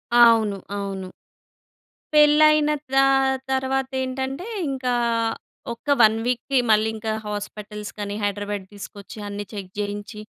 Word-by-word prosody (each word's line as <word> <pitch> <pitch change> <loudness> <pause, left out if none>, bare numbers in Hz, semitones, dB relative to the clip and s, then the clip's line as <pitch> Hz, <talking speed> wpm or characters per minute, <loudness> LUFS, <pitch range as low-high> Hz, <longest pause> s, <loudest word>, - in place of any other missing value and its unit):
అవును, 225 -4 +6 0.2
అవును. 195 -2 -4 1.1
పెళ్లి 300 0 +6
అయిన 300 0 +3 0.2
తా 270 0 +6 0.5
తర్వాత 265 0 0
ఏంటంటే, 265 +6 -3 0.2
ఇంకా 255 -2 -1 0.8
ఒక్క 235 - -18
1 220 0 +6
వీక్‌కి 250 +2 0
మళ్ళీ 215 +1 +4
ఇంకా 220 0 -3
హాస్పిటల్స్‌కని 210 0 -6
హైదరాబాద్ 205 -1 -2
తీసుకొచ్చి, 200 +1 -10
అన్నీ 205 0 -5
చెక్ 190 -3 -7
చేయించి, 205 +1 -5
215 Hz, 110 wpm, -23 LUFS, 205-265 Hz, 1.1 s, అవును